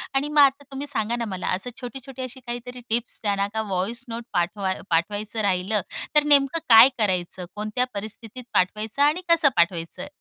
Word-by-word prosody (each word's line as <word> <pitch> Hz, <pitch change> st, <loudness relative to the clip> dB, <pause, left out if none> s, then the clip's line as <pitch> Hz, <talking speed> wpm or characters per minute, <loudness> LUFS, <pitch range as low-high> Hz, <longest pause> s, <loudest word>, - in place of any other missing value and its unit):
आणि 275 Hz, +2 st, +1 dB
मग 300 Hz, 0 st, +2 dB
आता 280 Hz, +1 st, +4 dB
तुम्ही 275 Hz, +2 st, -5 dB
सांगा 230 Hz, -4 st, 0 dB
ना 235 Hz, -1 st, -3 dB
मला 185 Hz, -2 st, -5 dB
असं 225 Hz, +7 st, -4 dB
छोटी-छोटी 260 Hz, +2 st, -8 dB
अशी 255 Hz, +1 st, -7 dB
काहीतरी 245 Hz, +1 st, -6 dB
टिप्स 235 Hz, +2 st, 0 dB
त्यांना 200 Hz, -2 st, 0 dB
का 220 Hz, -, 0 dB
वॉइस 200 Hz, +6 st, -2 dB
नोट 230 Hz, +1 st, -5 dB
पाठवा 190 Hz, +2 st, 0 dB, 0.2 s
पाठवायचं 205 Hz, +6 st, -1 dB
राहिलं, 195 Hz, +1 st, +1 dB, 0.3 s
तर 300 Hz, -, +6 dB
नेमकं 290 Hz, +1 st, +4 dB
काय 230 Hz, +3 st, +10 dB
करायचं? 185 Hz, -4 st, -1 dB
कोणत्या 215 Hz, +4 st, -1 dB
परिस्थितीत 220 Hz, +4 st, -7 dB
पाठवायचं 215 Hz, +7 st, 0 dB
आणि 305 Hz, +5 st, +3 dB
कसं 330 Hz, -4 st, +6 dB
पाठवायचं? 170 Hz, -1 st, 0 dB
225 Hz, 170 wpm, -24 LUFS, 200-260 Hz, 0.3 s, काय